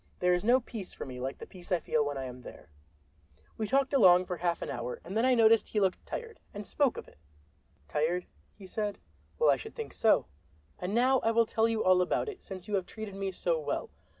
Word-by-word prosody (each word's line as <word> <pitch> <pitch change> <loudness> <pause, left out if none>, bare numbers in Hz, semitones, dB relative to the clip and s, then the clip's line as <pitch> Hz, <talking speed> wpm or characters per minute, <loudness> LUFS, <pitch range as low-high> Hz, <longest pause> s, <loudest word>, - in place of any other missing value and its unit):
There 180 0 +3
is 180 - 0
no 245 +4 +5
peace 220 -5 -7
for - - -7
me 125 -2 -8
like 130 +2 -4
the - - -9
peace 180 -1 -13
I 180 - +3
feel 155 -1 +1
when 145 -1 -3
I 135 - -3
am 125 0 -8
there." 100 -9 -12 0.8
We 220 - -3
talked 270 +4 +1
along 185 -8 +6
for 180 -1 -4
half 170 -1 -1
an - - -5
hour, 120 -1 -4
and 190 - -7
then 225 +3 +3
I 255 - +4
noticed 225 -1 +5
that - - -19
he 215 - +2
looked 190 -2 0
tired, 460 -2 -6 0.2
and 205 0 -6
spoke 280 +2 +1
of - - -7
it. - - -20 0.7
"Tired?" 170 - 0 0.3
he 200 - -11
said. 205 +1 -3 0.4
"Well, 475 - +5
I - - +2
should 440 - -10
think 455 -2 -6
so. 220 - +3 0.5
And 185 +4 -3
now 255 +2 +4
I 225 - +1
will 230 0 +4
tell 225 0 +1
you 225 -1 0
all 185 0 +5
about 180 - 0
it, 400 -3 -9
since 185 -3 -8
you 210 - -5
have 190 -3 0
treated 220 -2 -7
me 195 0 -3
so 170 -3 -1
well. 150 - -3
195 Hz, 245 wpm, -30 LUFS, 175-230 Hz, 0.8 s, along